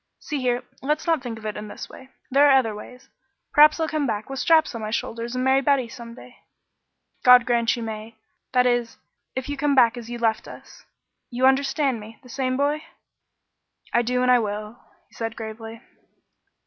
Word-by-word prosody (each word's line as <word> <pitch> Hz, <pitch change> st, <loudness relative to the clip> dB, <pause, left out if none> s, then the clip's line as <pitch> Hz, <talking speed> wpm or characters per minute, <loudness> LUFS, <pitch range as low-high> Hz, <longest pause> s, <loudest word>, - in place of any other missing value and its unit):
See 295 Hz, -3 st, -4 dB
here, 245 Hz, -1 st, 0 dB, 0.2 s
let's 300 Hz, +3 st, -1 dB
not 325 Hz, -4 st, +1 dB
think 240 Hz, -3 st, -6 dB
of 220 Hz, -, -12 dB
it 215 Hz, -, -3 dB
in 210 Hz, -, -6 dB
this -, -, -8 dB
way. 260 Hz, -, -14 dB, 0.2 s
There 280 Hz, +2 st, +6 dB
are 270 Hz, -, +7 dB
other 225 Hz, -5 st, +1 dB
ways. 250 Hz, +5 st, -11 dB, 0.5 s
Perhaps 305 Hz, +2 st, +6 dB
I'll 320 Hz, -, 0 dB
come 305 Hz, -2 st, -1 dB
back 215 Hz, +3 st, -3 dB
with 270 Hz, -, -4 dB
straps 320 Hz, -1 st, +3 dB
on 230 Hz, -, -6 dB
my 215 Hz, -, -4 dB
shoulders 235 Hz, +2 st, -3 dB
and 255 Hz, -, -1 dB
marry 265 Hz, +1 st, +3 dB
Betty 275 Hz, -2 st, +2 dB
some 235 Hz, -1 st, -10 dB
day." 250 Hz, 0 st, -14 dB, 0.9 s
"God 250 Hz, -1 st, +8 dB
grant 235 Hz, -2 st, +2 dB
you 235 Hz, -, -5 dB
may; 220 Hz, 0 st, -7 dB, 0.4 s
that 250 Hz, -1 st, +3 dB
is, 240 Hz, -2 st, 0 dB, 0.4 s
if 260 Hz, +1 st, -3 dB
you 285 Hz, 0 st, -4 dB
come 285 Hz, 0 st, +1 dB
back 245 Hz, -2 st, +5 dB
as 235 Hz, -1 st, -8 dB
you 240 Hz, -, -5 dB
left 225 Hz, -2 st, 0 dB
us. -, -, -13 dB, 0.4 s
You 250 Hz, +1 st, 0 dB
understand 270 Hz, -1 st, +2 dB
me? 215 Hz, +1 st, -12 dB
The 250 Hz, -, -15 dB
same 255 Hz, 0 st, -2 dB
boy?" 290 Hz, +2 st, 0 dB, 1.1 s
"I 240 Hz, -, +4 dB
do 250 Hz, +1 st, 0 dB
and 250 Hz, -, +4 dB
I 250 Hz, -, +6 dB
will," 210 Hz, +1 st, -5 dB, 0.3 s
he -, -, -30 dB
said 225 Hz, 0 st, -4 dB
gravely. 225 Hz, +1 st, -8 dB
250 Hz, 200 wpm, -24 LUFS, 230-270 Hz, 1.1 s, God